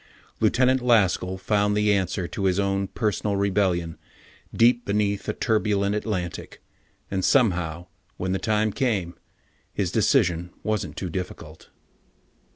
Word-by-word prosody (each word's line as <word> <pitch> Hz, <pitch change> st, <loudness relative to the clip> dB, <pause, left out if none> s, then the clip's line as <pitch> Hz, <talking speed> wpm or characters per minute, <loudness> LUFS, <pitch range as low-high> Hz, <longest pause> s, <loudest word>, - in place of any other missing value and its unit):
Lieutenant 130 Hz, +1 st, +3 dB
Laskell 95 Hz, -6 st, +2 dB
found 105 Hz, +1 st, +1 dB
the 105 Hz, 0 st, +3 dB
answer 95 Hz, -2 st, -1 dB
to 95 Hz, -, -4 dB
his 95 Hz, 0 st, +2 dB
own 100 Hz, 0 st, 0 dB
personal 105 Hz, -1 st, -1 dB
rebellion 95 Hz, -4 st, 0 dB, 0.5 s
deep 120 Hz, +1 st, +3 dB
beneath 100 Hz, 0 st, -1 dB
a -, -, 0 dB
turbulent 105 Hz, -3 st, 0 dB
Atlantic, 100 Hz, -5 st, -4 dB, 0.5 s
and 95 Hz, -1 st, -1 dB
somehow, 90 Hz, -, +1 dB, 0.3 s
when 95 Hz, 0 st, -2 dB
the 95 Hz, -, 0 dB
time 110 Hz, 0 st, +1 dB
came, 105 Hz, -10 st, -1 dB, 0.6 s
his 95 Hz, -4 st, -2 dB
decision 90 Hz, -, +2 dB
wasn't 105 Hz, -3 st, -2 dB
too 90 Hz, -3 st, -4 dB
difficult.... 85 Hz, -3 st, -7 dB
100 Hz, 125 wpm, -24 LUFS, 90-105 Hz, 0.6 s, Lieutenant